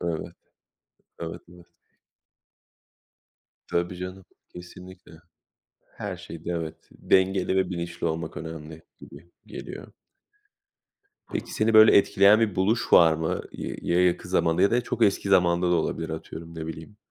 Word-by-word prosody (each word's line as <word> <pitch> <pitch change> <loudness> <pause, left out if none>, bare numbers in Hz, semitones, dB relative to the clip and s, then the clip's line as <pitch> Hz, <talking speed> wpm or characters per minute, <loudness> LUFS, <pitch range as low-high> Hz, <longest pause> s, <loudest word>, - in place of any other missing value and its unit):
Evet, 85 -2 -4 0.9
evet, 80 -1 -6
evet. 90 -1 -16 2.0
Tabii 85 +1 -2
canım, 90 +1 -7 0.2
kesinlikle. 90 +1 -13 0.9
Her - - -5
şeyde 85 +1 -8
evet, 80 -2 -4 0.2
dengeli 95 0 +1
ve 95 -1 +1
bilinçli 85 -1 -4
olmak 80 0 -4
önemli, 80 -1 -8 0.2
gibi, 80 +5 -14 0.2
geliyor. - - -9 1.4
Peki, - - -4
seni 110 +1 +1
böyle 110 0 +8
etkileyen 100 +1 +5
bir 110 -5 0
buluş 105 +5 0
var 80 -2 +7
mı? 80 0 -2
Y - - -6
ya, 90 +1 +2
yakın 90 - -1
zamanda 85 +1 +1
ya 100 - +4
da 120 +1 +2
çok 120 -1 -5
eski 100 0 +1
zamanda 90 -1 +3
da - - +4
olabilir. 80 0 -2
Atıyorum, 80 +1 -8
ne 80 -1 -6
bileyim, 80 +6 -9
90 Hz, 135 wpm, -25 LUFS, 80-95 Hz, 2.0 s, böyle